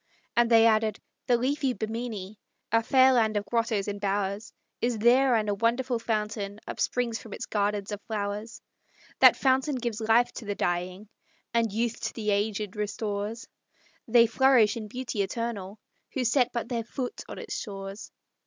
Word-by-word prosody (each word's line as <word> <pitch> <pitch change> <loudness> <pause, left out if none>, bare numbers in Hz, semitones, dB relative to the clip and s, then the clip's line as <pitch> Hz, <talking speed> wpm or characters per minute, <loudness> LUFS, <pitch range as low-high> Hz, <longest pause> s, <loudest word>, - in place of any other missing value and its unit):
And 235 -1 +4
they 225 -1 +6
added: 220 -1 +2 0.3
"The 245 - +4
leafy 270 +2 0
Bimini, 220 -3 -5 0.3
A 230 +1 +4
fair 260 +2 +5
land 220 -3 +2
of 205 - -2
grottos 220 -2 0
and 205 0 -4
bowers, 200 +1 -2 0.3
Is 240 -1 0
there; 245 +3 +4
and 215 -1 +1
a 205 - +1
wonderful 235 +3 0
fountain 210 -2 -3
Upsprings 240 -2 -1
from 220 - -10
its - - -5
gardens 205 -1 -1
of 205 0 -5
flowers. 210 +1 -4 0.6
That - - +8
fountain 265 +2 +2
gives 235 -3 -3
life 225 +2 +3
to 230 - -8
the 205 -1 -3
dying, 180 +2 -2 0.5
And 230 -2 +2
youth 230 +2 -1
to - - -3
the 215 -2 -1
aged 205 0 -1
restores; 210 +1 -3 0.6
They 235 0 +6
flourish 235 -2 +4
in 220 -2 -5
beauty 245 -2 -3
eternal, 205 -1 -4 0.4
Who 260 - -1
set 245 +1 +2
but 235 -1 -3
their 235 -2 -2
foot 250 +2 -5
on - - -7
its - - -5
shores!" 195 -1 -7
225 Hz, 165 wpm, -27 LUFS, 205-240 Hz, 0.6 s, That